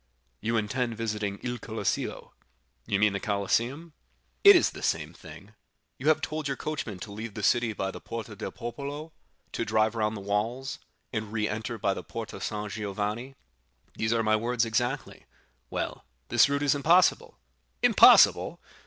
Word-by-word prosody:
"You 115 +2 0
intend 115 +1 -1
visiting 105 -3 -2
Il 125 -1 -3
Colosseo." - - -3 0.6
"You 100 - +1
mean 105 0 +3
the 100 - -2
Colosseum?" 120 - -1 0.5
"It 405 0 +10
is - - +4
the - - -10
same - - -1
thing. - - -13 0.5
You 135 - -4
have 155 - +4
told 155 -1 -3
your 135 - -2
coachman 150 -10 -4
to 105 - -7
leave 110 +1 -7
the 110 - -5
city 120 +2 +3
by 95 -2 -3
the - - -10
Porta 115 -2 -6
del - - -5
Popolo, 145 +6 -6 0.4
to - - -2
drive 110 0 +2
round 110 -1 -1
the - - -7
walls, 110 +7 -2 0.3
and 110 -2 -3
re 105 -1 0
enter 110 +2 -4
by 100 -2 +1
the - - -7
Porta 115 -2 -7
San 105 0 -3
Giovanni?" 105 +5 -4 0.6
"These 110 0 -1
are 115 -1 +2
my 110 0 +3
words 120 +1 0
exactly." 120 +5 -2 0.4
"Well, - - -4 0.3
this 120 +3 +5
route 140 0 0
is 145 - +4
impossible." 165 +6 +3 0.5
"Impossible!" - - +6
115 Hz, 165 wpm, -28 LUFS, 105-135 Hz, 0.6 s, It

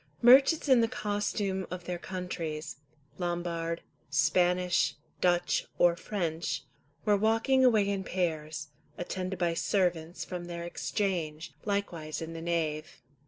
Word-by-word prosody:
Merchants 270 +6 +7
in 260 -3 +6
the 230 - +3
costume 205 -3 -2
of 180 0 -6
their 175 0 -4
countries, 170 -5 -5 0.4
Lombard, 170 -1 -2 0.3
Spanish, 175 +4 +2 0.3
Dutch, 175 -1 +2
or 175 -1 +5
French, 170 -5 -2 0.4
were 210 - +5
walking 225 +6 +3
away 220 -5 +5
in 200 -1 -1
pairs, 155 -4 -2 0.3
attended 185 +1 -3
by 170 -1 +1
servants, 175 -2 0
from 180 -1 -5
their 170 -1 -5
Exchange, 165 -4 -2
likewise 175 -7 -2
in 165 0 -6
the 165 - -6
nave. 160 -3 -2
175 Hz, 120 wpm, -30 LUFS, 165-200 Hz, 0.4 s, Merchants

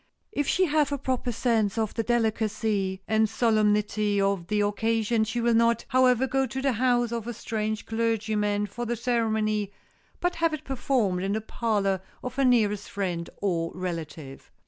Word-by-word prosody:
If 290 -9 -1
she 370 - +3
have 300 -3 +2
a 285 - 0
proper 255 -2 -2
sense 225 -3 +1
of 220 -2 0
the 230 - -1
delicacy 220 -4 0
and 220 0 +2
solemnity 210 -2 +2
of 195 -3 0
the 210 +1 +1
occasion 220 +2 +1
she 235 +2 -3
will 235 0 +3
not, 230 0 +3
however, 255 0 +4
go 265 +1 0
to 260 +3 -4
the 270 0 +1
house 240 0 +1
of 230 -1 -3
a 240 - -4
strange 215 0 -3
clergyman 215 -2 0
for 230 +4 -5
the 240 - -1
ceremony 220 -3 0 0.5
but 355 0 -1
have 330 -1 +2
it 305 - -11
performed 245 -8 0
in 195 +1 -1
the 220 - -1
parlor 205 -4 0 0.2
of 250 - -4
her 275 - +3
nearest 210 -5 +2
friend 180 -4 -3
or 165 -4 0
relative. 165 -6 -6
220 Hz, 170 wpm, -26 LUFS, 205-240 Hz, 0.5 s, however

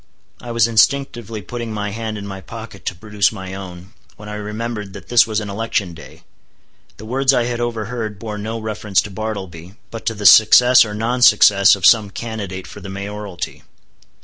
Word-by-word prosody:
I 120 - -9
was 115 -1 +2
instinctively 115 -2 +1
putting 120 -2 -6
my 105 -1 -4
hand 110 0 -5
in 100 - -7
my 95 -1 -7
pocket 110 -2 -10
to 90 - -2
produce 105 +1 0
my 95 -3 -8
own, 95 +1 -9 0.2
when 105 0 -10
I - - -6
remembered 105 -1 -5
that 95 -4 -12
this 120 -1 +5
was 110 -1 -1
an 105 - -6
election 100 -3 -2
day. 80 - -14 0.7
The 110 - -11
words 130 +3 +2
I 120 - +2
had 120 0 -3
overheard 115 -2 -4
bore 105 0 -6
no 110 +2 -4
reference 110 -3 -1
to 105 - -9
Bartleby, 95 -4 -6 0.2
but 115 - -8
to 115 - 0
the 105 0 -7
success 125 +4 +7
or 105 -1 -6
non 120 +4 -2
success 105 -4 +6
of 95 - -3
some 110 -3 +5
candidate 100 -4 -6
for - - -11
the 100 0 -9
mayoralty. 100 -1 -6
105 Hz, 190 wpm, -19 LUFS, 100-115 Hz, 0.7 s, success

